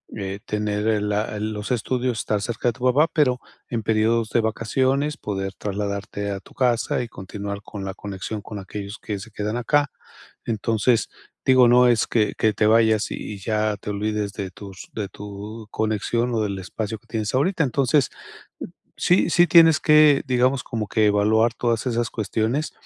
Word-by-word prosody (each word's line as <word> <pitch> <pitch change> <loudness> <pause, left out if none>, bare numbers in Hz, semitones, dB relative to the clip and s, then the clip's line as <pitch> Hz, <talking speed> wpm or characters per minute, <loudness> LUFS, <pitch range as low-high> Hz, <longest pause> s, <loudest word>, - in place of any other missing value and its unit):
eh, 100 -2 -4
tener 105 0 -1
el 105 -1 +1
la 105 +1 -1
el 110 +1 -3
los 105 +1 -5
estudios, 125 0 -1
estar 105 -2 -1
cerca 120 +3 -1
de 120 - -2
tu 125 - -11
papá, 140 +6 +4
pero 130 -5 +2 0.3
en 115 -2 -2
períodos 110 +1 +1
de 115 - +2
vacaciones 130 +6 0
poder 95 -1 -4
trasladarte 100 0 -4
a 100 - -4
tu - - -19
casa 120 -2 +1
y - - -6
continuar 100 0 -6
con 100 -1 -8
la 95 - -4
conexión 100 +1 -6
con 105 0 -7
aquellos 100 +2 -7
que 105 - -4
se 110 +4 -10
quedan 105 +2 -3
acá, 145 +4 +2 0.6
entonces, 115 +1 +1 0.4
digo, 130 -2 +6
no 125 +1 +6
es 120 -3 +3
que 110 -3 +1
que 110 - +3
te 105 - +2
vayas 110 -1 +3
y - - -2 0.2
y - - -10
ya 105 +1 0
te 105 - -6
olvides 105 0 -2
de 100 -3 -5
tus 95 -1 -11
de 105 -3 -3
tu 105 +3 -9
conexión 110 +3 -1
o 110 - +1
del 100 -2 -2
espacio 105 +3 -5
que - - -31
tienes 110 -3 -3
ahorita, 165 +5 +2
entonces, 135 0 +2 0.9
sí 180 - +3
sí, 175 0 +5
tienes 165 -3 +6
que 150 -2 +6
digamos 130 0 +2
como 110 -3 -3
que 110 +1 +2
evaluar 110 +3 +3
todas 120 0 -1
esas 120 -1 0
cuestiones, 110 +7 -1
110 Hz, 180 wpm, -23 LUFS, 105-125 Hz, 0.9 s, digo